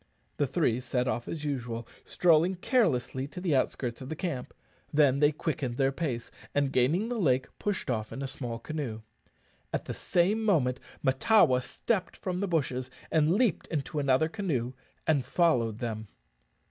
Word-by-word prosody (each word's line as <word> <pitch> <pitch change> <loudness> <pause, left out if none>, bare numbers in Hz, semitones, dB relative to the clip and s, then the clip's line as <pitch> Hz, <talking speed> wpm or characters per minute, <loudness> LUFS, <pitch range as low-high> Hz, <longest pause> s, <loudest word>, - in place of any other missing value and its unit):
The 145 - +2
three 125 -7 +1
set 125 0 -1
off 120 -1 -2
as 155 -2 -4
usual, 120 -5 -3 0.2
strolling 175 +1 +3
carelessly 170 - +1
to 165 - -8
the 175 -5 +1
outskirts 125 -2 -1
of 130 - -7
the 160 - -3
camp; 160 -7 -3 0.4
then 145 -2 +4
they 145 0 +5
quickened 145 -5 -3
their 135 -1 +3
pace, 135 -6 -3 0.2
and, 140 -1 +2
gaining 155 - +2
the 240 -1 -2
lake, 130 -8 +2
pushed 205 -2 -2
off 110 -4 -2
in 135 - -5
a - - -2
small 120 -3 -5
canoe. 125 -4 -4 0.7
At - - -2
the - - -4
same 200 +6 +1
moment 140 - +2 0.2
Mahtawa 130 - +4
stepped 185 - -2
from 180 -1 -3
the 200 - 0
bushes, 130 -7 -1 0.2
leaped 170 +7 +3
into 150 -1 -2
another 140 +2 +3
canoe, 155 - -2 0.3
and 150 -4 +3
followed 125 -7 +2
them. 110 -2 -4
140 Hz, 160 wpm, -29 LUFS, 125-170 Hz, 0.7 s, they